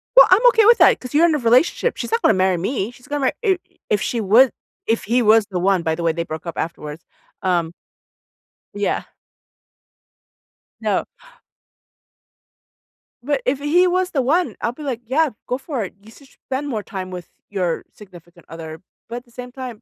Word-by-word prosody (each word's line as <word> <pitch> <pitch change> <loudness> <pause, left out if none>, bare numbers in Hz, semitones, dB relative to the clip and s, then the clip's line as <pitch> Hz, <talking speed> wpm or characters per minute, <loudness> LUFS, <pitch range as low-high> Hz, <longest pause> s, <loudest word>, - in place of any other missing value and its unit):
Well, - - +9
I'm 410 +7 +5
okay 450 -3 +4
with 465 +2 +7
that, - - +6
‘cause 250 - -9
you're 315 +4 +5
in 320 -3 +3
a - - +1
relationship. 255 - +2
She's - - -5
not 460 0 +1
gonna - - +4
marry 185 -1 +2
me. 210 +3 -2
She's 245 +2 -18
gonna 290 -1 -2
marry 260 - +1
i 380 -2 +3 0.3
if 210 -1 +1
she 235 -2 -1
would, 230 +6 +5 0.4
if 225 0 +1
he 240 +4 +1
was 220 -1 +5
the 180 - -1
one- 185 -1 +2
by 160 0 0
the 170 - -5
way, 165 - +3
they 170 +1 -3
broke 160 +1 -7
up 170 - -6
afterwards, 160 -1 -5 0.4
um 170 -3 +1 1.0
Yeah. 205 0 -1 1.8
No. - - 0 2.2
But 285 -1 0
if 265 +2 0
he 330 +6 +3
was 365 +1 0
the 275 - +1
one, 330 +8 +1
I'll 235 - 0
be 300 - -13
like, 250 -4 -3
“Yeah, 295 +5 +2 0.2
go 250 - -1
for 270 -5 -4
it. 185 - -7
You 220 +2 -16
should 280 - -17
spend 270 +2 -6
more 220 -6 -2
time 185 -3 -6
with 180 -2 -8 0.2
your 180 -5 -1
significant 175 -3 -16
other,” 160 0 -8 0.3
but 235 +1 -5
at 245 - -9
the 235 - -25
same 250 +1 -9
time, 250 -4 -8
235 Hz, 195 wpm, -20 LUFS, 185-285 Hz, 2.2 s, Well